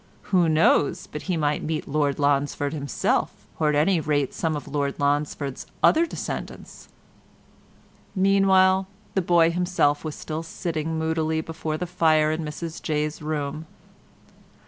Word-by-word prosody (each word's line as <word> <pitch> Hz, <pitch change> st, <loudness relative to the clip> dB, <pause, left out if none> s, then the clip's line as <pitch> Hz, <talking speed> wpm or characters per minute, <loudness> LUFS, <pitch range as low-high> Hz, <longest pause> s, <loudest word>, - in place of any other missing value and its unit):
Who 175 Hz, -3 st, +4 dB
knows 155 Hz, -2 st, +3 dB
but 150 Hz, -, -7 dB
he 180 Hz, -, +1 dB
might 150 Hz, -1 st, 0 dB
meet 155 Hz, 0 st, -3 dB
Lord 145 Hz, -1 st, 0 dB
Lonsford 145 Hz, 0 st, 0 dB
himself, 140 Hz, -4 st, -1 dB
or 155 Hz, -2 st, +2 dB
at 150 Hz, -, +1 dB
any 165 Hz, +4 st, +3 dB
rate 145 Hz, -3 st, 0 dB
some 160 Hz, -1 st, -1 dB
of 145 Hz, -, -6 dB
Lord 140 Hz, -1 st, -2 dB
Lonsford's 145 Hz, -1 st, -1 dB, 0.2 s
other 335 Hz, +2 st, +5 dB
descendants?" -, -, -7 dB, 1.3 s
Meanwhile 190 Hz, -1 st, +4 dB, 0.3 s
the 190 Hz, -, +1 dB
boy 170 Hz, -1 st, +4 dB
himself 175 Hz, -4 st, +1 dB
was 155 Hz, -2 st, -4 dB
still 155 Hz, 0 st, -5 dB
sitting 160 Hz, -1 st, -3 dB
moodily 160 Hz, 0 st, 0 dB
before 160 Hz, -1 st, -4 dB
the 180 Hz, -, -3 dB
fire 155 Hz, -3 st, +2 dB
in 155 Hz, +1 st, -2 dB
Mrs 160 Hz, +2 st, -6 dB
Jay's 150 Hz, 0 st, -2 dB
room. 155 Hz, 0 st, -3 dB
155 Hz, 140 wpm, -24 LUFS, 145-170 Hz, 1.3 s, other